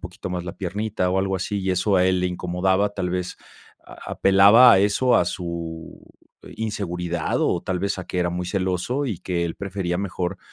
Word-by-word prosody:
poquito 95 - -7
más 90 -1 -3
la 90 - -7
piernita 100 0 -2
o 95 - +1
algo 95 0 0
así, 100 +2 -3
y 95 0 -1
eso 95 +2 +1
a 90 - +4
él 95 -1 +2
le 90 - +1
incomodaba, 90 +3 0
tal 90 -3 -2
vez, 90 0 -3 0.5
a - - -10
apelaba 100 +6 +7
a 95 - +5
eso, 105 +6 +3
a 90 - +3
su 85 -2 -6 0.6
inseguridad 90 -6 -3
o - - 0
tal 90 -1 -2
vez, 100 -1 -2
a 95 - -6
que 90 - -4
era 90 -1 +1
muy 90 0 -4
celoso 95 +9 -1
y 100 -8 -3
que 85 -2 -2
él 85 - -4
prefería 95 -3 -3
mejor 95 -1 -3
95 Hz, 200 wpm, -23 LUFS, 90-100 Hz, 0.6 s, apelaba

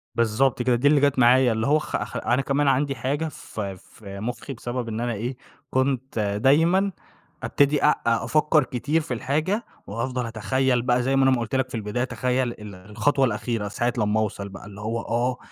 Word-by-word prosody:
بالضبط 115 +3 +2
كده، 125 0 +2
دي 125 +4 +2
اللي 145 -1 +5
جات 140 -2 +2
معايا. 125 +1 +5
اللي 110 0 -1
هو 150 +2 +4
خ 150 - -3
خ 105 - -7
أنا 125 +3 +1
كمان 140 +1 0
عندي 135 +1 +2
حاجة 140 +6 -2
في 100 -9 -6
في 100 +1 -11
مُخّي 125 +5 -5
بسبب 120 0 -4
إن 110 0 -4
أنا 120 0 -1
إيه، 120 +4 -4 0.3
كنت 130 -2 -1
دايمًا 145 - +3 0.5
أبتدي 145 +1 +2
أ - - +6
أفكّر 150 +6 +3
كتير 145 +6 -1
في 140 - -4
الحاجة، 155 - -1 0.2
وهأفضل 125 +4 -3
أتخيّل 125 +3 0
بقى 125 0 +1
زي 135 +2 +1
ما 135 - +4
أنا 135 - +5
ما 130 - +2
قُلت 115 +2 -3
لك 130 -1 0
في - - -6
البداية 110 +3 -2
أتخيّل 125 -1 -1
ال 105 -3 -10
الخطوة 110 +9 0
الأخيرة 115 -1 -2
ساعة 120 +4 -1
لمّا 105 0 +1
أوصل 100 -2 -3
بقى، 95 - -11
اللي 105 0 -10
هو 115 +2 -2
آه، 120 +2 -1
125 Hz, 195 wpm, -24 LUFS, 110-135 Hz, 0.5 s, أ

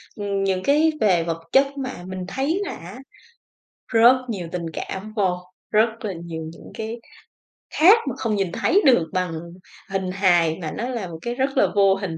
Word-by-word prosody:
ừm, 200 -2 -2
những 190 -1 0
cái 300 +5 +4
về 185 -6 +3
vật 165 0 -4
chất 275 +1 +5
mà 260 -9 -5
mình 185 -1 -5
thấy 275 - -1
là 390 - -5
á, 185 +8 -10 0.9
rất 235 +2 +6
nhiều 190 -7 -4
tình 175 -2 -3
cảm 195 +6 -6
vô, 190 -4 +2 0.3
rất 220 +2 +4 0.2
là 205 - -2
nhiều 165 -1 -6
những - - -13
cái 220 +1 -5 0.8
khác 375 +8 +8
mà 250 - -4
không 225 -4 -1
nhìn 195 -3 -1
thấy 395 - +2
được 240 - +5
bằng 185 -2 -1 0.6
hình 190 -1 -2
hài, 175 -4 +3
mà 155 -2 -4
nó 235 - -4
là 235 -7 -3
một 165 -2 -8
cái 240 +5 -3
rất 270 +1 -1
là - - +5
vô 195 -1 +5
hình. 190 -4 -4
200 Hz, 190 wpm, -23 LUFS, 180-245 Hz, 0.9 s, khác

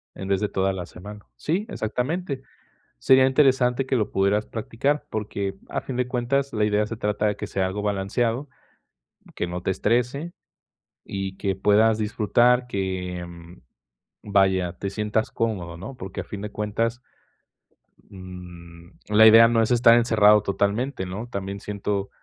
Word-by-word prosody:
En 95 - -7
vez 100 -1 +1
de 105 - 0
toda 95 0 0
la 90 -2 -5
semana. 105 +4 -11
Sí, 185 +8 -1
exactamente. 135 +5 -3 0.6
Sería 130 - +5
interesante 130 -2 +3
que 130 - 0
lo 110 -4 0
pudieras 100 +2 +1
practicar 130 +6 -2
porque, 100 -2 -3
a - - -2
fin 130 - -6
de 125 0 0
cuentas, 135 +3 -1
la 105 -1 +1
idea 105 0 +1
se 115 - -6
trata 105 0 0
de 105 - 0
que - - -5
sea 95 -1 -1
algo 100 +2 -4
balanceado, 115 +6 -1 0.9
que - - -2
no 90 0 -5
te 95 - -1
estrese 125 - 0 0.7
y 95 -1 -5
que 95 -2 -1
puedas 105 +3 +3
disfrutar, 120 +3 +2
que, 95 -4 -3
mm, 85 0 -13 0.6
vaya, 95 -3 +2
te 100 - -3
sientas 105 +2 -1
cómodo, 95 -7 -2
¿no? 110 +9 -8
Porque 95 -6 -6
a - - -8
fin 100 -1 -8
de 105 0 -6
cuentas, 115 +4 -2 1.1
mm, 90 -2 -11 0.2
la 105 +1 +6
idea 115 +1 +9
no 115 -1 +2
es 110 - -1
estar 120 -1 +6
encerrado 105 -3 +5
totalmente, 100 +3 -1
¿no? 105 +6 -6
También 100 -2 -5
siento 100 -1 -3
105 Hz, 160 wpm, -24 LUFS, 95-120 Hz, 1.1 s, idea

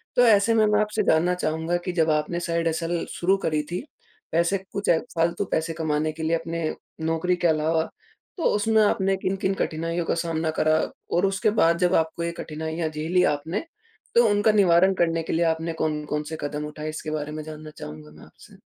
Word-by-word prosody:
तो 245 - +6
ऐसे 220 0 +5
में 220 -1 +4
मैं 210 0 +3
आपसे 210 0 0
जानना 175 +2 +3
चाहूँगा 160 0 -1
कि 180 - -1
जब 160 - +2
आपने 150 +3 0
साइड 170 -1 -1
हसल 165 +1 -1
शुरू 190 +3 +1
करी 155 -1 +1
थी 180 - -2 0.5
पैसे 170 +4 +2
कुछ 200 0 -3
फ़ालतू 170 +2 +1
पैसे 165 +1 0
कमाने 155 -1 -1
के 160 +1 -7
लिए 160 +1 +2
अपने 165 -1 -3 0.4
नौकरी 165 +3 +1
के 175 -1 +1
अलावा, 160 +1 +1 0.5
तो 335 - -4
उसमें 220 +1 +3
आपने 195 -1 +2
किन-किन 190 0 -1
कठिनाइयों 165 +1 -2
का - - 0
सामना 165 -1 -1
करा 155 0 +4 0.4
और 175 - +3
उसके 195 +2 +1
बाद 170 +1 +4
जब 180 +1 +2
आपको 160 +1 0
ये 170 - -1
कठिनाइयाँ 160 +1 -3
झेली 160 +4 +1
आपने 160 - -4 0.5
तो 235 -1 +6
उनका 205 +2 +3
निवारण 190 -2 +5
करने 165 -2 +1
के - - -3
लिए 170 +1 +2
आपने 165 0 0
कौन-कौन 150 -1 -2
से - - -3
कदम 150 +1 -3
उठाए? 150 +1 -6
इसके 155 0 -5
बारे 150 0 -3
में 155 0 -5
जानना 155 0 -9
चाहूँगा 75 0 -9
मैं 75 - -15
आपसे। - - -18
165 Hz, 195 wpm, -25 LUFS, 155-180 Hz, 0.5 s, तो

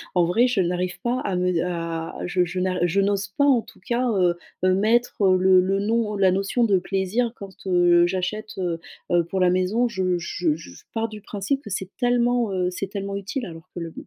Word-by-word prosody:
En 175 -1 +4
vrai 225 +9 +3
je 245 -5 0
n'arrive 180 0 -1
pas 245 +3 0
à 195 -3 -2
me 180 -2 +1
à 165 -2 -4
je 180 0 +1
je 180 +1 -3
n'ar 185 0 0
je 175 +3 +2
n'ose 200 0 +1
pas 285 - +4
en 265 -5 +4
tout - - -18
cas, 240 +6 -1
heu, 180 -5 +2 0.3
heu, 185 - +4
mettre, 220 +5 +1
heu, 185 -1 +5
le 185 0 +5
le 195 +2 0
nom, 215 +1 0
ou - - -3
la 190 -2 +4
notion 195 +6 0
de 200 -5 +3
plaisir 195 +6 -1
quand, 195 -1 -9 0.2
heu, 175 -1 +5
j'achète, 190 +4 -3
heu, 175 -3 -2 0.3
heu, 175 -1 +4
pour 190 +3 -3
la 180 -1 +4
maison. 185 +7 +1
Je 185 -5 0
je 170 -2 -1
je 90 - -12
pars 225 0 -1
du 215 -1 -9
principe 205 +7 -2
que 210 - -10
c'est 190 -1 -4
tellement, 245 -2 +2
heu, 180 -1 0
c'est 195 +2 -4
tellement 200 0 -5
utile 200 +6 -4
alors 165 -3 -11
que - - -4
le 165 -1 -6
190 Hz, 225 wpm, -24 LUFS, 180-215 Hz, 0.3 s, heu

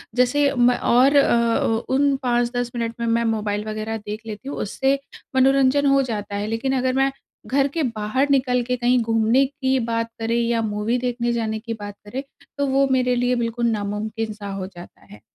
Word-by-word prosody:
जैसे 275 +3 +3
मैं 245 0 +4
और 260 +4 +4
अ, 235 -3 +2
उन 280 0 +3
5-10 240 0 0
मिनट 230 -1 -2
में 235 - -1
मैं 230 +1 +2
मोबाइल 210 -2 -1
वगैरह 215 +1 -3
देख 210 0 -7
लेती 220 +6 -7
हूँ - - -5
उससे 270 +6 0 0.4
मनोरंजन 270 +1 +4
हो 275 0 +4
जाता 210 -5 -4
है 205 +1 -2
लेकिन 230 +5 -1
अगर 255 0 0
मैं 270 0 +2 0.4
घर 275 +1 +2
के 325 -2 0
बाहर 235 +4 -1
निकल 255 -2 +2
के 250 +1 -1
कहीं 245 +1 +3
घूमने 225 +4 +3
की 265 -1 -1
बात 230 0 -2
करे 225 +1 -1
या 235 -1 +1
मूवी 215 +2 -1
देखने 240 -1 -1
जाने 220 -2 -2
की 230 0 -5
बात 205 -2 -8
करे, 260 +6 -5 0.3
तो 285 -1 0
वो 275 +1 +3
मेरे 250 -1 +2
लिए 245 +1 +1
बिल्कुल 235 0 -1
नामुमकिन 215 +1 -3
सा 205 -1 -8
हो 190 -1 -4
जाता 175 -2 -13
है। - - -14
235 Hz, 190 wpm, -22 LUFS, 220-260 Hz, 0.4 s, मैं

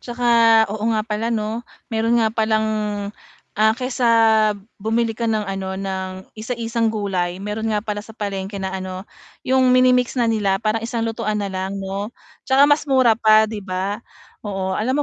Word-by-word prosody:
'Tsaka 235 -2 +4
oo 215 - -5 0.2
nga 215 - -1
pala, 225 +1 -2
'no, 220 0 -2 0.3
mayro'n 225 +1 +2
nga 220 - 0
palang 220 -1 +1 0.9
ah, 220 0 +5
kaysa 255 -1 -1 0.7
bumili 225 +2 0
ka 230 - -1
ng, 215 -1 +1
ano, 195 -1 -4
ng 190 -1 -5
isa-isang 230 0 -2
gulay, 185 -4 -2
mayro'n 215 +2 -3
nga 210 - 0
pala 210 -1 -3
sa 220 +1 -13
palengke 200 -1 -4
na, 190 -1 -3
ano, 185 0 -5 0.4
'yong 260 0 +3
mini-mix 250 0 +3
na 240 - +2
nila 200 -3 +1
para 215 +1 +1
isang 230 0 -3
lutuan 215 -1 -2
na 200 - -3
lang, 190 +1 -3
'no. 195 +2 -4 0.4
'Tsaka 270 +2 +6
mas 295 +1 +2
mura 260 -4 +5
pa, 215 -1 +5
'di 220 - -4
ba? 190 +1 -3 0.5
Oo, 190 -2 -2
alam 250 +5 0
mo 295 - +2
220 Hz, 170 wpm, -21 LUFS, 195-230 Hz, 0.9 s, Tsaka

